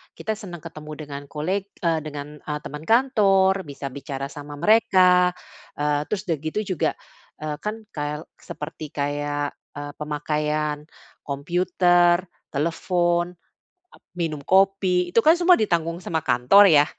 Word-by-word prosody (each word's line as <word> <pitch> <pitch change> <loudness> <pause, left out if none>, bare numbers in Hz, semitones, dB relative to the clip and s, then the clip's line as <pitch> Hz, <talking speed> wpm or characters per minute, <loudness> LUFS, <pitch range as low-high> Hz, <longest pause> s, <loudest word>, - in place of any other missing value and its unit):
kita 220 - -3
senang 180 -6 -9
ketemu 155 -2 -9
dengan 145 -1 -7
koleg 185 +7 -2 0.2
eee, 165 -2 +2
dengan, 150 0 -7
eee, 150 0 -4
teman 150 +2 -7
kantor, 195 - +3
bisa 140 0 -6
bicara 135 0 -5
sama 145 0 -9
mereka. 185 -4 +5 0.5
Eee, 150 0 +1
terus 205 -3 -2
udah 165 -3 0
gitu 155 +7 -3 0.2
juga, - - +2 0.5
eee, 155 -1 -3
kan 210 +1 -2 0.2
kael 150 0 -3 0.2
seperti 155 +1 -8
kayak, 145 0 -2 0.2
eee, 145 0 -6
pemakaian 150 0 -1 0.5
computer, 175 +4 +3 0.4
telefon, 175 +3 0 0.6
ap - - -19 0.2
minum 160 -4 -2
kopi, 190 +1 +3
itu - - +6
kan 315 - +8
semua 355 +1 +5
ditanggung 170 -5 0
sama 160 -3 -2
kantor, 130 +13 +6
ya. 145 - +6
160 Hz, 135 wpm, -23 LUFS, 150-185 Hz, 0.6 s, kan